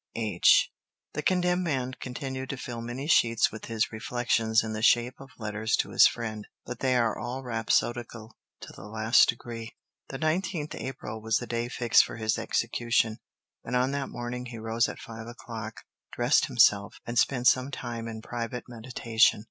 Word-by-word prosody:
H." 110 -2 +4 0.4
The 150 - -2
condemned 180 +1 +2
man 130 -6 -1
continued 130 0 -5
to 140 - -4
fill 120 -2 -6
many 120 +4 -5
sheets 115 -7 +3
with 110 - -8
his 115 -1 -1
reflections 115 -1 +1
in 110 -1 -4
the 110 - -4
shape 120 +2 +4
of 135 - -11
letters 110 0 -1
to - - -1
his - - +7
friend. 110 -3 -5 0.2
But 125 -1 -6
they 130 -1 +2
are 115 -2 +2
all 125 +4 -4
rhapsodical 115 -1 -1 0.3
to - - -10
the 95 - -11
last 110 +2 +4
degree. 115 -1 -5 0.3
The 135 - -5
19th 155 +1 -1
April 110 -4 -6
was 110 0 +1
the 120 - -4
day 120 0 -2
fixed 120 -2 +4
for - - -7
his 110 0 -1
execution, 115 -1 0 0.4
and 125 - -3
on 125 +2 +2
that 140 -1 -2
morning 120 +1 -5
he 120 -1 -8
rose 115 +1 0
at - - -7
five 115 0 -9
o'clock, 115 -2 -8 0.3
dressed - - +3
himself, 100 0 +4
and 120 0 0
spent 125 -3 +1
some 130 +1 +4
time 120 -4 -5
in 110 -1 -7
private 120 +1 -4
meditation. 115 -2 +2
120 Hz, 175 wpm, -28 LUFS, 110-125 Hz, 0.4 s, his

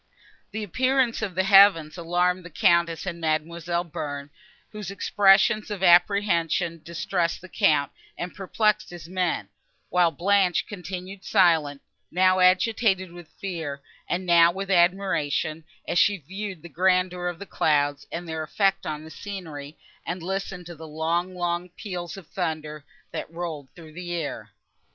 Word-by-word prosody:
The 215 +1 -5
appearance 255 +4 +1
of 200 -5 -3
the 185 - +2
heavens 195 -5 +6
alarmed 180 +1 0
the 180 - -10
Countess 170 -2 +2
and 170 -3 -5
Mademoiselle 170 +2 -1
Bearn, 145 -3 -6 0.4
whose 210 -3 -6
expressions 200 +2 +3
of 200 -3 -4
apprehension 175 -2 +3
distressed 170 +1 -2
the 185 - -12
Count, 150 -4 +2 0.3
and 175 +1 -5
perplexed 210 +2 0
his 175 -3 -10
men; 180 -1 -1 0.4
while 180 -1 +4
Blanche 185 0 +2
continued 185 0 -7
silent, 160 -8 +2 0.3
now 185 +1 +3
agitated 185 0 +3
with 175 -1 -12
fear, 160 -8 -5 0.3
and 185 +1 -1
now 170 -1 +6
with 195 +2 -5
admiration, 170 -4 +1 0.2
as 175 - +2
she 205 -1 +4
viewed 190 +2 -7
the - - -8
grandeur 180 +2 +1
of 175 -1 -3
the 200 - -8
clouds, 145 -5 +1
and 175 +1 -5
their 160 -1 -3
effect 195 +5 0
on 155 0 -4
the 160 - -11
scenery, 160 -8 -8 0.3
and 175 0 -5
listened 190 0 -4
to 175 - -8
the 160 0 -10
long, 165 +4 -1
long 175 0 -2
peals 175 -2 -6
of 195 - -10
thunder, 155 -4 -4 0.3
that - - -5
rolled 165 -5 -6
through 160 -3 -13
the 175 +1 -7
air. 160 -4 -4
175 Hz, 150 wpm, -25 LUFS, 165-190 Hz, 0.4 s, heavens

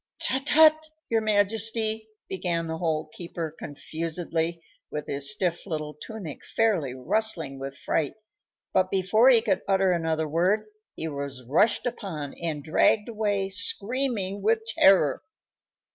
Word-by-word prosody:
"Tut! 265 +2 +2
Tut! 315 0 +6 0.2
your 225 -1 +3
majesty," 220 +1 +1 0.2
began 175 -3 -2
the 160 0 -4
Hole 155 -2 -1
keeper, 170 -2 -6
confusedly, 165 +2 -4 0.3
with 150 0 -5
his 140 +3 +2
stiff 185 -3 -1
little 155 -3 -4
tunic 165 0 -8
fairly 185 - 0
rustling 160 - -1
with 135 +1 -7
fright; 150 -4 -1 0.6
but 185 0 +2
before 195 +6 +4
he 235 -4 +5
could 200 -5 +1
utter 190 -1 +3
another 160 -2 0
word 185 +8 +1 0.3
he 160 - -4
was 140 -4 -6
rushed 205 - +3
upon 185 - -4
and 155 -4 -3
dragged 210 +8 +2
away, 205 -3 -1
screaming 205 0 -2
with 220 +2 +1
terror. 190 -10 +4
185 Hz, 130 wpm, -26 LUFS, 155-220 Hz, 0.6 s, Tut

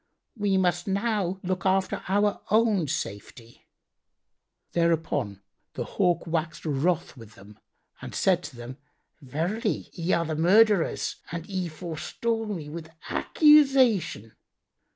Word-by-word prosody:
We 205 -3 +1
must 175 -1 +1
now 200 -2 -1
look 185 0 -2
after 190 0 +1
our 205 +2 +1
own 215 -6 +3
safety." 115 +1 -6 1.0
Thereupon 155 - 0 0.3
the - - -2
Hawk 180 -3 0
waxed 165 -1 -3
wroth 155 +3 0
with 115 -4 -13
them 100 +2 -16 0.4
and - - -8
said - - +2
to - - -9
them, 120 +2 -9 0.4
"Verily, 175 - -2
ye 175 +1 -2
are 170 - +1
the 160 0 -3
murtherers, 195 +3 +3
and 170 -1 -5
ye 185 -2 -3
forestall 185 +8 -3
me 175 -8 -5
with 160 +1 -8 0.2
accusation!" 265 - +4
175 Hz, 120 wpm, -26 LUFS, 155-205 Hz, 1.0 s, accusation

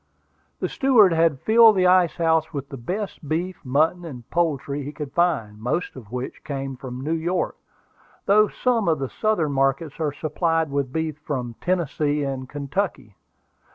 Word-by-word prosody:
The - - -1
steward 230 -9 +4
had 160 -4 +2
filled 225 -1 +6
the 185 -1 +3
ice 180 -2 +4
house 160 -1 +1
with 140 -3 -5
the - - -7
best 175 - -5
beef, 175 +3 -2
mutton, 155 +6 +1
and 125 -8 -9
poultry 145 -4 0
he 140 +1 -5
could 150 -2 -7
find, 140 -12 0
most 155 +10 -2
of 115 -6 -12
which 125 +1 -5
came 135 -2 -4
from 125 0 -7
New 155 +4 -1
York, 170 +3 -1 0.7
though 215 +2 +5
some 235 -4 0
of 160 -2 +3
the 135 -1 -3
Southern 210 -9 0
markets 135 +3 0
are 155 -2 0
supplied 160 +1 -1
with 140 -2 -1
beef 160 0 -3
from 130 -6 -4
Tennessee 150 -4 0
and 135 -2 -4
Kentucky. 145 - -3
155 Hz, 165 wpm, -23 LUFS, 135-175 Hz, 0.7 s, filled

